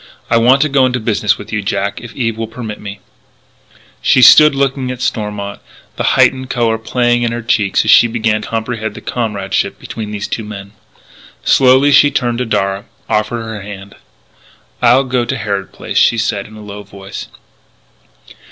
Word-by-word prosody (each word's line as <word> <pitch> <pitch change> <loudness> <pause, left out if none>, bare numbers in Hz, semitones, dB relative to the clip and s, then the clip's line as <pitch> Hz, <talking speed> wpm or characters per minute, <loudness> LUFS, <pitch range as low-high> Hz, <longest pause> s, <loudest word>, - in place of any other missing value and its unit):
"I 115 - +5
want 130 +5 +4
to - - +1
go 135 -2 +3
into 125 0 -2
business 105 -2 0
with 105 +1 -10
you, 105 - 0
Jack 100 0 -2
if 115 -1 -11
Eve 115 -4 -1
will 115 0 -4
permit 110 -2 -7
me 100 -1 -8 0.5
" - - -36 0.3
She 130 - +4
stood 150 +1 +8
looking 135 -1 -1
at 125 -1 -5
Stormont, 105 -4 -3 0.4
the - - -3
heightened 130 -1 +3
colour 115 -3 0
playing 120 +1 0
in 120 -1 0
her 120 0 -4
cheeks 105 -4 +1
as - - +4
she 120 - +7
began 110 -2 -1
to - - -8
comprehend 110 -1 -4
the - - -9
comradeship 105 -5 -2
between 110 -2 -7
these 105 -1 -4
two 115 - -4
men. 100 -2 -9 0.7
Slowly 130 +2 +4
she 145 +1 +6
turned 120 -3 -1
to 125 - -1
Darragh, 100 -2 -1 0.2
offered 110 +2 -1
her 110 -2 -6
hand: 100 0 -10 0.9
"I'll 125 +2 +5
go 130 -2 -1
to 120 - -3
Harrod 100 -3 -3
Place," - - -2
she 115 - +3
said 110 -3 -2
in 110 - -14
a 110 - -11
low 105 0 -8
voice. 100 -1 -9
115 Hz, 185 wpm, -15 LUFS, 105-125 Hz, 0.9 s, stood